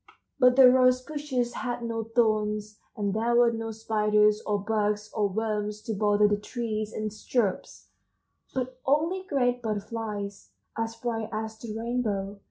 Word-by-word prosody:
But 250 0 +6
the 265 -1 +9
rose 255 0 +5
bushes 255 -4 -3
had 240 -1 -3
no 230 -1 -2
thorns, 215 -2 0 0.2
and 200 -2 -1
there 230 +2 +1
were 240 -1 +5
no 225 0 -4
spiders 210 -1 +2
or 210 -1 +2
bugs 210 0 -1
or 210 -2 +1
worms 210 0 -2
to 225 - -3
bother 210 0 +3
the 205 0 +1
trees 215 -1 -4
and 215 -1 -4
shrubs, 215 -2 -2 0.6
but 255 0 -4
only 320 +7 +1
great 250 -9 0
butterflies 210 -2 -4 0.2
as 225 0 -3
bright 225 -1 -3
as 220 0 -4
the 220 -2 -6
rainbow. 215 -4 -2
220 Hz, 150 wpm, -27 LUFS, 210-240 Hz, 0.6 s, the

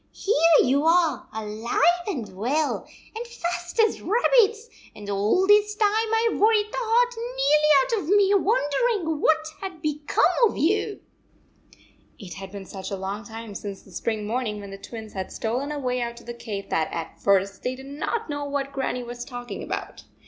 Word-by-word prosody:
" - - -41
Here 330 -5 +4
you 275 +3 +2
are 335 -1 +3
alive 220 +2 -3 0.3
and 245 - -4
well, 280 +10 -1 0.3
and 470 +2 -5
fat 350 -4 -4
as - - -3
rabbits, 455 0 +3 0.3
and 205 -1 -10
all 205 - +2
this 420 +1 +4
time 420 -1 +3
I 450 +1 +2
Ve - - -3
worried 430 0 +4
the - - -5
heart 485 +1 +2
nearly 460 -11 +2
out - - -3
of 395 +3 +2
me 400 0 +4
wondering 390 - +1
what 315 0 +3
had 380 -4 -6
become 300 -1 +1 0.2
of - - -6
you! 410 +5 0 1.2
It 195 -6 -9
had 195 -1 -8
been 200 -1 -8
such 190 0 -7
a 200 - -3
long 195 +3 -4
time 225 -2 -8
since 200 -1 -7
the 195 - -18
spring 215 +3 -2
morning 220 -1 -2
when 200 -1 -9
the 195 - -8
Twins 220 0 -9
had 190 -1 -5
stolen 250 +6 -2
away 250 -4 -2
out 235 0 -4
of - - -17
the 240 - -6
cave 215 -4 -6
that 160 - 0
at 165 -1 -6
first 195 0 +2
they 250 +1 -2
did 265 +1 -11
not 300 +11 -3
know 290 -1 -3
what 280 -1 -3
Grannie 260 -2 -2
was 240 0 -6
talking 245 -1 -7
about. - - -6
285 Hz, 185 wpm, -25 LUFS, -, 1.2 s, Here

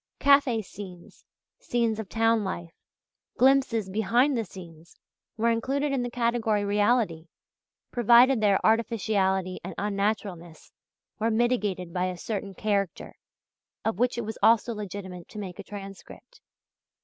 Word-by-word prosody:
Café 275 -6 +4
scenes, 180 -3 -11 0.4
scenes 230 -2 -1
of 210 -4 -6
town 225 -1 +2
life, 170 -3 -5 0.6
glimpses 260 -5 +3
"behind 235 +8 +2
the 230 - 0
scenes," 170 -4 -13 0.4
were 230 +1 +2
included 275 +5 -1
in 270 -2 0
the 245 - -2
category 230 -3 0
reality, 205 -5 +1 0.6
provided 240 +1 +5
their 200 -2 +3
"artificiality" 200 -4 +1
and 180 -1 -7
"unnaturalness" 200 -5 -3 0.5
were 225 +1 +1
mitigated 215 -7 0
by 180 0 0
a 185 -1 -3
certain 200 0 -5
"character" 200 -3 -2 0.7
of 220 -3 -1
which 245 0 +1
it 235 - -3
was 220 +1 -6
also 230 +1 +4
legitimate 190 -4 -7
to - - -11
make 190 -2 -7
a - - -6
transcript. 200 - -11
215 Hz, 130 wpm, -27 LUFS, 190-235 Hz, 0.7 s, provided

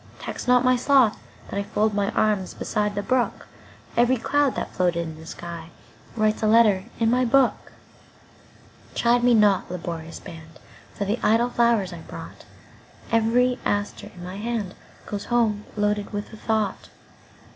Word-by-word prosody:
Tax - - -6
not 250 0 +4
my 255 0 +5
sloth 255 -3 +3 0.3
that 200 - -3
IFold 210 +1 0
my 200 0 0
arms 210 -4 0
beside 210 -1 -1
the 205 - -2
brook; 250 -3 0 0.5
Each 240 0 +2
cloud 290 -2 +2
that - - -4
floated 175 -2 +1
in 160 - -7
the 160 +1 -12
skyWrites 170 +6 -5
a 215 - +2
letter 215 -4 +4
in 225 -1 +3
my 250 +1 +3
book. 255 +1 +2 1.2
Chide 240 +1 +3
me 245 -1 +5
not, 205 -3 +3
laborious 170 -2 -6
band, 160 -1 -12 0.4
For 200 - -2
the 210 +4 -1
idle 235 +3 +3
flowers 230 -7 +2
I 170 - -8
brought; - - -10 0.7
Every 245 +3 +2
aster 205 0 -2
in 175 - -10
my 180 +2 -7
handGoes 210 -2 -5
home 220 -4 +1
loaded 210 0 0
with 205 +2 -5
a - - -7
thought. 215 -3 -2
215 Hz, 150 wpm, -24 LUFS, 195-240 Hz, 1.2 s, my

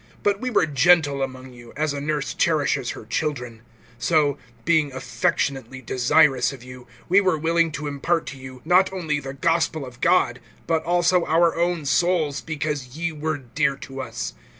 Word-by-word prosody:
(7)But 200 -1 +2
we 255 - -2
were 210 -8 +3
gentle 145 -1 +3
among 130 -1 -5
you, 120 -1 -14
as 155 -1 0
a 140 - -4
nurse 150 -1 -2
cherishes 150 -6 +1
her - - -10
children; 125 -3 -3 0.4
(8)so, 150 -1 +2 0.3
being 155 -4 +2
affectionately 130 0 -2
desirous 130 +2 +3
of 130 -3 -11
you, 125 0 -12 0.2
we 195 +3 +5
were 185 -5 +2
willing 165 +1 +1
to 150 - -5
impart 150 +4 -1
to 135 - -7
you, 130 -1 -11
not 180 +3 +4
only 160 -6 -2
the 135 -1 -7
gospel 160 0 0
of 125 -1 -13
God, - - +3 0.3
but 160 -1 0
also 175 +1 +3
our 165 +1 +3
own 170 -2 0
souls, 155 -1 +1
because 150 -4 -4
ye 170 0 -1
were 155 0 -3
dear 140 +3 -1
to 135 -1 -8
us. 115 - -5
150 Hz, 175 wpm, -23 LUFS, 135-165 Hz, 0.4 s, we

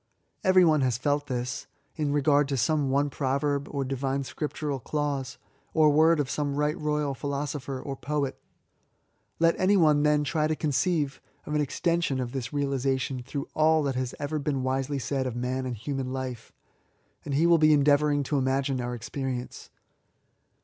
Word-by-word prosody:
Every 185 -2 +6
one 155 -3 +4
has 125 -3 +1
felt 145 +3 0
thia, 125 -2 -2 0.5
in 150 -3 -1
regard 145 0 +3
to 135 -1 -1
some 140 +3 +1
one 140 +2 +1
proverb^ 140 +1 -1
or 140 -2 -2
divine 135 +1 -2
scriptural 150 0 -4
clause^ 145 0 -3 0.4
or 155 -2 +5
word 160 +2 +4
of 145 - 0
some 145 +1 -2
right 150 +1 +1
royal 150 -3 -1
philosopher 140 0 -4
or 135 +1 -5
poet. 140 -1 -2 1.0
Let 165 0 +4
any 195 +2 +4
one 155 -4 +4
then 150 0 +3
try 155 +1 0
to 155 - 0
conceive 150 0 0 0.2
of 150 - -5
an 150 - +2
extension 165 -1 0
of 125 -2 -3
this 125 -3 -4
realisation 135 -2 -1
through 140 +3 -5
all 155 0 +3
that 140 -2 0
has 130 -1 -3
ever 150 +1 -2
been 140 -2 -1
wisely 135 +2 -1
said 135 0 -2
of 125 - -4
man 130 +1 -2
and 125 - -3
human 135 +3 -3
life^ 130 -3 -5 0.7
and 140 - -3
he 155 +4 +3
will 170 -1 +5
be 155 0 +5
endeavouring 145 0 +3
to 140 +1 0
imagine 135 0 0
our 120 0 -3
ex 120 0 -8
perience. 130 -3 -5
140 Hz, 175 wpm, -27 LUFS, 130-150 Hz, 1.0 s, Every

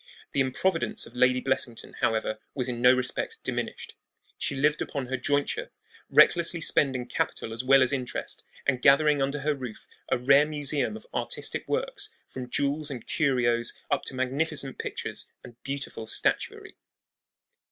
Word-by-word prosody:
The - - -1
improvidence 160 +7 0
of - - -13
Lady 125 +1 +4
Blessington, 130 -3 -1
however, 110 -1 0 0.2
was 130 -3 0
in 120 -1 -3
no 125 0 +8
respect 125 -1 -1
diminished. - - -4 0.4
She 140 - -2
lived 150 +3 +2
upon 140 -2 -3
her 130 +1 -2
jointure, 145 +3 -1 0.4
recklessly 170 0 +5
spending 130 -5 +2
capital 115 -2 -2
as 115 +2 -3
well 135 +1 +6
as 130 - +2
interest, 130 -3 -4 0.2
and 130 -3 +1
gathering 145 +1 +5
under 140 +1 -1
her 150 +2 +1
roof 125 -6 -8 0.2
a - - +2
rare 135 +4 +5
museum 145 -6 0
of - - -14
artistic - - -2
works, - - -2 0.2
from 125 -1 -7
jewels 145 +3 0
and 125 -5 -6
curios 120 -6 +1 0.2
up 145 - +2
to 130 - -5
magnificent 135 +2 -1
pictures - - -4 0.2
and 120 -1 -14
beautiful 140 -5 -5
statuary. - - 0
135 Hz, 150 wpm, -27 LUFS, 125-145 Hz, 0.4 s, no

